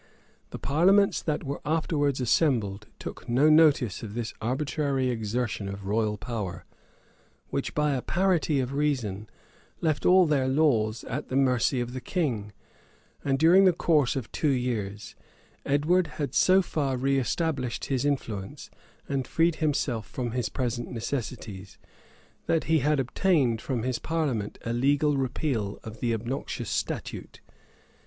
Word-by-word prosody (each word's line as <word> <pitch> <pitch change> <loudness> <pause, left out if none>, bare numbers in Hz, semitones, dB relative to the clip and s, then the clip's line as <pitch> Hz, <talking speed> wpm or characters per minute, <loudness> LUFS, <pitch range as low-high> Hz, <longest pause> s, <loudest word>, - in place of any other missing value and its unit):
[] - - -36
The - - -6
parliaments 190 +8 +3
that 150 -2 -2
were 140 -1 -4
afterwards 150 -3 0
assembled 115 -6 +1
took 125 - -8
no 140 +6 +4
notice 145 - +4
of 105 -2 -7
this 120 -1 -3
arbitrary 135 +2 0
exertion 110 -2 -2
of 100 0 -7
royal 105 +1 0
power, 100 -6 -5 0.8
which, - - -3
by 150 -1 +2
a 130 - -1
parity 175 -4 +1
of 130 +1 -2
reason, 125 -9 -1 0.5
left 155 -3 0
all 185 0 +6
their 140 -4 +1
laws 125 -6 +2
at 140 +5 -4
the 130 - -4
mercy 130 -1 +2
of 120 0 -3
the 130 - -5
king; 120 - -2 0.7
and, 135 -1 +1
during 175 +6 +6
the 185 - +6
course 150 -6 +2
of 130 -5 -4
two 155 - 0
years, 115 -6 -2 0.5
Edward 160 +6 +2
had 145 -2 -3
so 190 +1 +5
far 140 -6 -1
reëstablished 135 0 -1
his 130 -2 -1
influence, 115 -9 -3 0.4
and 135 -3 -2
freed 165 0 +2
himself 140 -7 -1
from 120 -2 -4
his 125 -1 -2
present 120 -2 -3
necessities, 110 -6 -5 0.7
that 165 - +2
he 160 0 +2
then 150 +3 +2
obtained 135 - +1
from 120 -4 -2
his 130 -1 -1
parliament 140 -11 -2
a 115 - -1
legal 145 +4 +2
repeal 130 -5 -2
of 110 +1 -9
the 120 - 0
obnoxious 115 +5 -3
statute. - - -4
130 Hz, 145 wpm, -27 LUFS, 115-150 Hz, 0.8 s, all